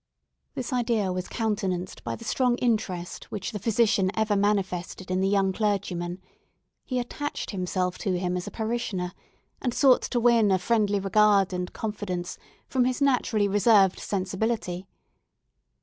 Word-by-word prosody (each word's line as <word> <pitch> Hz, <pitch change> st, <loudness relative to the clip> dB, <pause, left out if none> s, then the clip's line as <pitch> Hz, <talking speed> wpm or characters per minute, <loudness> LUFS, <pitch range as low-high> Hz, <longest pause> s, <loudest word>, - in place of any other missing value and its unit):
This 255 Hz, +1 st, -4 dB
idea 230 Hz, -6 st, +1 dB
was 180 Hz, 0 st, -3 dB
countenanced 195 Hz, -5 st, -2 dB
by -, -, -3 dB
the 230 Hz, -, -11 dB
strong 245 Hz, +1 st, +1 dB
interest 205 Hz, -8 st, -1 dB
which 205 Hz, +1 st, -5 dB
the 210 Hz, -, -4 dB
physician 215 Hz, -2 st, +2 dB
ever 220 Hz, -1 st, +1 dB
manifested 190 Hz, -3 st, -1 dB
in 185 Hz, +1 st, +1 dB
the 190 Hz, -, +2 dB
young 195 Hz, -1 st, +2 dB
clergyman; 185 Hz, -4 st, -1 dB, 0.6 s
he 255 Hz, -, -3 dB
attached 290 Hz, +4 st, -4 dB
himself 180 Hz, -2 st, -2 dB
to 185 Hz, -3 st, 0 dB
him 180 Hz, 0 st, -1 dB
as 180 Hz, -, -4 dB
a -, -, -5 dB
parishioner, 220 Hz, -6 st, -2 dB, 0.5 s
and 245 Hz, -2 st, -1 dB
sought 265 Hz, -3 st, +5 dB
to 240 Hz, -, -1 dB
win 235 Hz, -3 st, +4 dB
a 190 Hz, -, +4 dB
friendly 205 Hz, +1 st, +1 dB
regard 200 Hz, -1 st, +3 dB
and 180 Hz, 0 st, -3 dB
confidence 200 Hz, -5 st, -4 dB, 0.3 s
from 255 Hz, -2 st, +2 dB
his 255 Hz, 0 st, 0 dB
naturally 250 Hz, -6 st, +2 dB
reserved 200 Hz, -1 st, +4 dB
sensibility. 190 Hz, -1 st, -2 dB
205 Hz, 150 wpm, -26 LUFS, 185-230 Hz, 0.6 s, sought